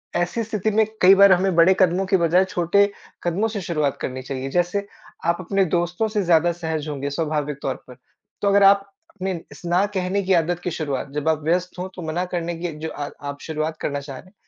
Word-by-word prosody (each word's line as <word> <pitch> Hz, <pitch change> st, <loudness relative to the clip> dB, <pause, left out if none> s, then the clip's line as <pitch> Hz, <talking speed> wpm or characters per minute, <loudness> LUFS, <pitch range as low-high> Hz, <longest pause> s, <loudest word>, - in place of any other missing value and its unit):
ऐसी 175 Hz, +7 st, 0 dB
स्थिति 215 Hz, -1 st, -1 dB
में 220 Hz, -, +5 dB, 0.2 s
कई 190 Hz, +2 st, +8 dB
बार 200 Hz, 0 st, +7 dB
हमें 185 Hz, 0 st, +3 dB
बड़े 170 Hz, +3 st, +6 dB
कदमों 185 Hz, 0 st, +3 dB
की 190 Hz, 0 st, +3 dB
बजाय 175 Hz, +2 st, +3 dB
छोटे 190 Hz, +3 st, +2 dB, 0.3 s
कदमों 175 Hz, +6 st, 0 dB
से 210 Hz, -2 st, -4 dB
शुरुआत 155 Hz, -6 st, -1 dB
करनी 130 Hz, 0 st, -4 dB
चाहिए 135 Hz, 0 st, -5 dB
जैसे 180 Hz, +4 st, 0 dB, 0.4 s
आप 170 Hz, 0 st, +2 dB
अपने 195 Hz, +2 st, +1 dB
दोस्तों 175 Hz, +5 st, 0 dB
से 210 Hz, -1 st, -1 dB
ज़्यादा 170 Hz, -1 st, +4 dB
सहज 160 Hz, -3 st, -4 dB
होंगे 140 Hz, -1 st, -3 dB
स्वाभाविक 150 Hz, -1 st, -2 dB
तौर 135 Hz, -, -2 dB
पर। 125 Hz, -1 st, -13 dB, 0.4 s
तो 205 Hz, -, +1 dB
अगर 200 Hz, 0 st, +5 dB
आप 195 Hz, 0 st, +6 dB, 0.3 s
अपने 190 Hz, -1 st, -2 dB, 0.2 s
इस -, -, -13 dB
ना 175 Hz, +3 st, +2 dB
कहने 190 Hz, +2 st, 0 dB
की 190 Hz, 0 st, +2 dB
आदत 175 Hz, 0 st, +1 dB
की 180 Hz, -, -2 dB
शुरुआत 145 Hz, -4 st, -3 dB
जब 155 Hz, +2 st, 0 dB
आप 155 Hz, -2 st, 0 dB
व्यस्त 180 Hz, +3 st, -1 dB
हो 180 Hz, -, -3 dB
तो 180 Hz, -, -7 dB
मना 175 Hz, +3 st, -1 dB
करने 170 Hz, -1 st, -2 dB
की 175 Hz, 0 st, -3 dB
जो 160 Hz, +1 st, -4 dB
आ 145 Hz, -1 st, -5 dB, 0.2 s
आप 140 Hz, 0 st, -7 dB
शुरुआत 155 Hz, 0 st, -3 dB
करना 145 Hz, -1 st, -2 dB
चाह 140 Hz, -2 st, -8 dB
रहे -, -, -13 dB
हैं, 185 Hz, -, -21 dB
175 Hz, 225 wpm, -22 LUFS, 155-190 Hz, 0.4 s, कई